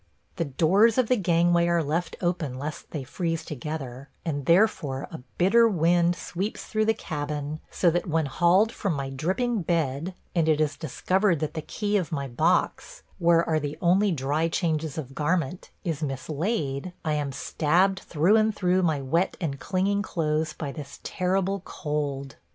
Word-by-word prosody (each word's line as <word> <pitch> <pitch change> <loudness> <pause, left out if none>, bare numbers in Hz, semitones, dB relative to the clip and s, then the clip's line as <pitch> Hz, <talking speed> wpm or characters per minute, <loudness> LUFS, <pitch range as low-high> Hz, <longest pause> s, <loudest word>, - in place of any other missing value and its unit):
The 170 - 0
doors 190 - +3
of 255 -3 +2
the 250 - +5
gangway 170 -3 +3
are 170 -1 +2
left 165 +4 -2
open 170 -7 -1
lest 145 +3 -6
they 145 -4 -4
freeze 165 +4 -3
together, 140 -2 -6 0.2
and 145 -4 -3
therefore 170 -7 +2
a 160 - -7 0.2
bitter 230 +6 +5
wind 175 -2 +3
sweeps 195 +6 -4
through 215 0 0
the 220 0 +2
cabin, 150 -4 -4
so 175 - +2
that 175 +2 -1
when 160 -1 +1
hauled 175 +10 +3
from 195 -6 -2
my 135 -1 -3
dripping 190 - -1
bed, 165 0 -1 0.2
and 165 -2 +2
it 155 -1 +3
is 155 -1 +1
discovered 180 +4 +1
that 155 - -2
the 160 - -3
key 210 +6 -1
of 180 -5 -2
my 140 -3 -2
box, 170 - 0 0.2
where 170 -1 +4
are 160 -1 +2
the 145 0 -4
only 190 +4 +3
dry 150 +2 0
changes 160 -3 -1
of 135 -4 -5
garment, 165 +3 -1
is 165 -3 -2
mislaid, 150 - -2
I 155 - +1
am 145 -2 -1
stabbed 175 +8 +1
through 175 +7 +2
and 215 -1 +2
through 185 -1 +2
my 160 -5 +1
wet 165 +8 0
and 140 -6 -3
clinging 200 +2 0
clothes 155 -4 -1
by 145 -3 -5
this 145 -1 -9
terrible 190 +1 0
cold. 145 -5 -4
165 Hz, 170 wpm, -26 LUFS, 150-185 Hz, 0.2 s, the